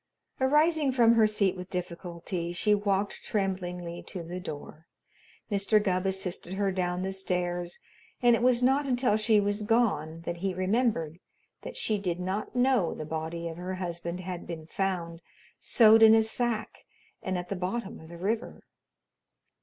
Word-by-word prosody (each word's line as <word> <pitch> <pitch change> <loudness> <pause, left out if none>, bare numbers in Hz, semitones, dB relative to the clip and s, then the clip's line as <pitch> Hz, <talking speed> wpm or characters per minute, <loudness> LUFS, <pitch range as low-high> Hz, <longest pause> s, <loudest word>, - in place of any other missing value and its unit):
Arising 300 +2 +3
from 235 -3 +5
her 225 -2 +5
seat 200 -3 +1
with 180 0 -8
difficulty, 175 -1 -4
she 210 +4 +2
walked 200 -1 0
tremblingly 180 -4 -3
to 180 -3 -7
the 175 +2 -6
door. 155 -1 -8 0.6
Mr. 200 +2 +3
Gubb 190 -2 0
assisted 190 -1 -3
her 195 0 +1
down 180 -1 -1
the 190 0 -2
stairs, 175 -2 -2 0.4
and 240 -1 +5
it - - -2
was 250 0 +3
not 275 +3 +3
until 250 -4 +2
she 215 0 +3
was 205 +1 0
gone 205 -8 +1
that 170 0 -4
he 190 +1 -2
remembered 185 -4 0 0.4
that - - -8
she 215 -2 0
did 180 -3 -2
not 190 +6 -3
know 250 -8 +2
the 155 - -6
body 160 +2 -4
of 165 0 -6
her 180 +1 -4
husband 175 -1 -4
had 180 -1 -6
been 165 -2 -6
found 170 -2 -3 0.4
sewed 225 -1 +6
in 220 0 +9
a 225 - +5
sack 225 0 -2 0.4
and 185 -1 -2
at 175 0 -5
the 200 - -2
bottom 190 +4 -4
of 160 - -13
the 170 - -9
river. 215 +6 -3
190 Hz, 165 wpm, -28 LUFS, 175-220 Hz, 0.6 s, in